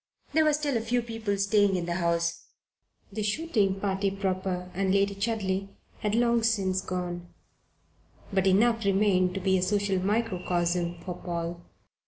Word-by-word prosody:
There 315 0 +4
were 305 - +4
still 290 -4 0
a - - -1
few 240 +2 0
people 225 -3 -3
staying 200 0 +3
in 175 -2 -1
the 170 - -2
house 170 -1 0 0.7
the 215 - -3
shooting 210 -4 0
party 195 0 0
proper, 185 -2 -2
and 190 +1 0
Lady 200 +1 +2
Chudley, 195 -2 -1 0.3
had 210 0 0
long 235 0 +3
since 195 -5 +1
gone 175 -1 -4 1.0
but 190 0 +2
enough 225 +4 +3
remained 195 -2 +2
to - - -1
be 190 0 +2
a - - -2
social 195 0 +1
microcosm 180 -4 0
for 180 0 -5
Paul. 170 0 -4
195 Hz, 155 wpm, -28 LUFS, 180-215 Hz, 1.0 s, There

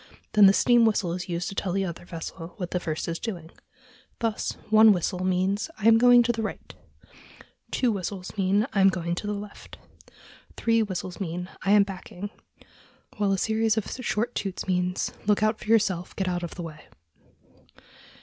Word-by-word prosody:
Then 210 -2 +8
the - - +7
steam 240 +2 +4
whistle 210 -6 +1
is 180 0 -5
used 170 0 -2
to - - -7
tell 190 -2 -2
the 195 0 0
other 170 -1 -7
vessel 165 0 -8
what 180 -4 -5
the 180 - 0
first 160 -3 -3
is 165 0 -3
doing. 175 -8 -6 0.7
Thus, 225 -2 -2 0.2
one 220 0 +8
whistle 180 0 -2
means 185 - 0
"I 215 - 0
am 225 0 +7
going 245 0 +7
to 240 - +2
the 225 -1 -3
right"; 220 - -6 1.0
two 250 -3 +1
whistles 195 -1 -5
mean 200 +2 +2
"I 200 - +2
am 195 - +7
going 170 -2 -2
to 190 +4 -4
the 210 - -1
left"; 205 0 -10 0.3
and - - -23
three 230 -1 +2
whistles 185 -3 -4
mean 180 -1 -4
"I 195 - +2
am 205 -1 +7
backing"; 195 +1 -8 0.9
while 205 -1 +1
a 195 - +1
series 220 +2 +1
of 215 - 0
short 240 -2 -2
toots 195 -2 -4
means 180 0 0 0.2
"Look 210 0 +3
out 215 0 +1
for - - -11
yourself; 200 -6 +1
get 190 - -2
out 175 -1 -1
of 175 - -6
the 175 - -6
way!" 155 -2 -8
195 Hz, 190 wpm, -26 LUFS, 180-215 Hz, 1.0 s, Then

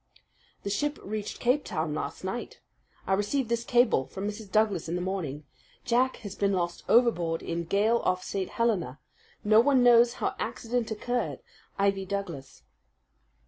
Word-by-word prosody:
"The 200 - -3
ship 290 +8 -1
reached 210 0 -5
Cape 255 +4 +2
Town 155 -2 -2
last 155 - -4
night. 190 +6 -5 0.5
I 195 - +1
received 215 +6 0
this 235 0 0
cable 240 - +3
from 195 +1 -5
Mrs. 210 -1 -7
Douglas 210 -6 +2
this 175 +2 -2
morning: 175 -6 -3 0.4
"'Jack 250 +2 +2
has 200 - -5
been 200 -1 0
lost 175 -2 -2
overboard 175 -9 +3
in 170 0 -3
gale 210 +6 +2
off 185 0 0
St. 190 -2 -3
Helena. 190 - 0 0.4
No 215 +1 +6
one 255 +1 +4
knows 240 0 +6
how - - -2
accident 235 0 -2
occurred.' 245 +3 -2 0.4
"'IVY 195 -1 +1
DOUGLAS.'" 175 - -5
205 Hz, 150 wpm, -28 LUFS, 180-235 Hz, 0.5 s, No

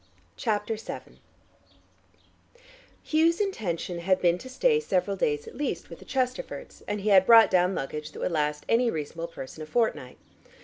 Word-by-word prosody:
CHAPTER 215 +1 -1
VII 220 - -9 1.8
Hugh's 325 +2 +2
intention 190 - -2
had 185 +2 +2
been 175 0 +2
to 260 - -10
stay 450 - +2
several 195 - 0
days, 145 -5 0
at - - -10
the - - -12
least, 250 - -3
with 170 - -9
the - - -14
Chesterfords, 260 - -3
and 205 0 -2
he 210 - 0
had 190 -2 +6
brought 230 -1 +8
down 180 +1 +3
luggage 150 +2 -5
that - - -10
would - - -1
last 150 -2 -1
any 235 +1 +3
reasonable 165 -1 -4
person 155 -1 -9
a 155 - -7
fortnight. 155 - -1
190 Hz, 170 wpm, -27 LUFS, 165-240 Hz, 1.8 s, brought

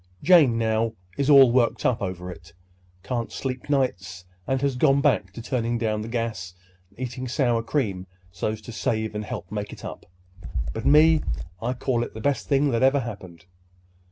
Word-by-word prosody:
Jane, 155 -10 +6
now, 110 0 0 0.2
is 140 0 0
all 135 -4 +8
worked 120 -1 +1
up 125 -3 +2
over 90 -2 -4
it; - - -13 0.5
can't 120 -2 -3
sleep 130 +1 -5
nights, 100 -10 -1 0.2
and 135 0 +1
has 140 -2 0
gone 135 +2 +4
back 140 -10 +1
to 115 - -8
turning 120 -1 -1
down 110 -2 -1
the 110 - -6
gas 115 -7 -4 0.3
and - - -24
eating 130 0 -4
sour 120 -2 +1
cream 105 -7 -2 0.2
so's 110 +5 -3
to 120 - -9
save 110 -1 -2
and 105 0 -3
help 95 -2 -7
make 105 -1 -4
it - - -10
up. - - -8 0.7
But - - -3
me—I 125 - +2
call 125 -1 -1
it - - -8
the - - -6
best 140 +4 -1
thing 140 0 +3
that 115 0 0
ever 135 +1 +4
happened." 95 -8 -9
115 Hz, 180 wpm, -25 LUFS, 105-130 Hz, 0.7 s, all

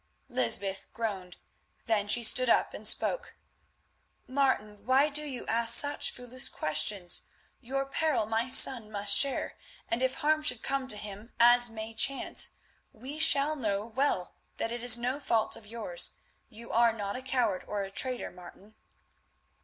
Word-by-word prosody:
Lysbeth 190 +11 -1
groaned. 195 -6 -5 0.5
Then 215 -3 -1
she 235 +3 +3
stood 250 +2 +4
up - - +1
and - - -6
spoke. - - -1 0.9
"Martin, 230 -6 -2
why 270 +3 +3
do 300 +1 0
you 270 -5 -7
ask 230 0 +4
such 290 0 +4
foolish 250 +1 0
questions? 175 +4 -2 0.4
Your 275 +2 -4
peril 275 -4 -1
my 225 +3 -2
son 250 -4 +6
must 200 -1 +3
share, 275 -1 -2 0.3
and 230 - -2
if 260 0 -1
harm 310 0 0
should 250 -6 -1
come 270 -1 -3
to 210 - +1
him 210 +2 -10
as 240 +1 +6
may 220 0 -8
chance, 265 +4 0 0.4
we 265 +7 -10
shall 305 -1 +5
know 210 -6 -3
well 235 -5 -2 0.2
that 225 - -4
it 240 0 -6
is 240 -1 +4
no 250 +4 -3
fault 230 -6 -1
of 210 - -14
yours. 235 - -3 0.3
You 230 +2 -12
are 235 0 +2
not 205 -2 -6
a 255 - -6
coward 245 -7 -2
or 205 -1 -4
a 195 - -9
traitor, 255 +4 -2
Martin." 185 +4 -16
235 Hz, 160 wpm, -28 LUFS, 210-265 Hz, 0.9 s, son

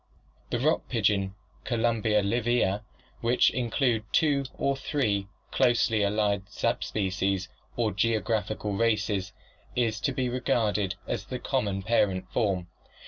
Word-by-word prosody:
(See - - -42
PL - - -34
I.) - - -35
The - - +3
rock - - +1
pigeon, 100 -2 +1 0.3
Columba 115 -3 +1
livia> 115 -1 +1 0.4
which 120 +2 +3
includes 120 -2 0
two 145 -3 +3
or 140 - +1
three 110 -9 -1 0.2
closely 120 -4 +3
allied 100 -1 +1
subspecies 95 -5 -1 0.3
or 115 -3 +1
geographical 110 0 0
races, 105 -3 +1 0.4
is 115 -3 +1
to 140 - 0
be 130 -1 -1
regarded 110 -6 0
as - - -3
the - - -4
common 100 -2 -1
parent 95 -4 +1
form. 100 -7 0
110 Hz, 130 wpm, -28 LUFS, 100-120 Hz, 0.4 s, The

